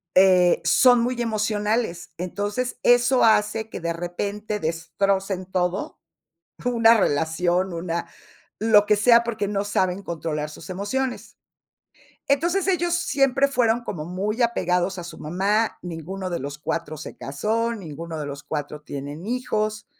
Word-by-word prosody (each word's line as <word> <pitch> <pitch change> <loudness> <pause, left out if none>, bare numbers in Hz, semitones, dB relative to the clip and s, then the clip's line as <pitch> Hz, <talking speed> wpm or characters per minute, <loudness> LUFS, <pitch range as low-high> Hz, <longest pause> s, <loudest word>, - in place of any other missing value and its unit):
eh, 185 -2 +5
son 245 +7 +5
muy 245 0 -1
emocionales. 215 -3 -1
Entonces, 205 +7 -3
eso 245 +1 +5
hace 220 0 +2
que - - -7
de 170 - -1
repente 200 +5 -4
destrocen 185 +4 -1
todo, 180 +1 -1 0.7
una 230 -2 +5
relación, 175 +3 +1
una 170 0 -3 0.5
lo 210 -1 +5
que 210 - +4
sea 235 +2 +5
porque 220 -4 -2
no 200 -1 -1
saben 190 -1 0
controlar 155 -2 -3
sus 155 - -11
emociones. 245 +8 -3 0.9
Entonces, 345 +7 +2
ellos 345 -2 +1
siempre 275 -4 +2
fueron 240 -3 +2
como 165 -9 -5
muy 200 +7 -2
apegados 185 -5 +1
a - - -6
su 170 - -9
mamá, 200 +8 0
ninguno 180 +2 -5
de 170 - -2
los 140 +2 -6
4 155 0 -3
se 155 - -9
casó, 220 +12 -1
ninguno 165 -4 -7
de 150 - -4
los 140 0 -7
4 150 0 -5
tienen 145 +4 -7
hijos. 215 -3 -2
200 Hz, 140 wpm, -24 LUFS, 170-230 Hz, 0.9 s, eh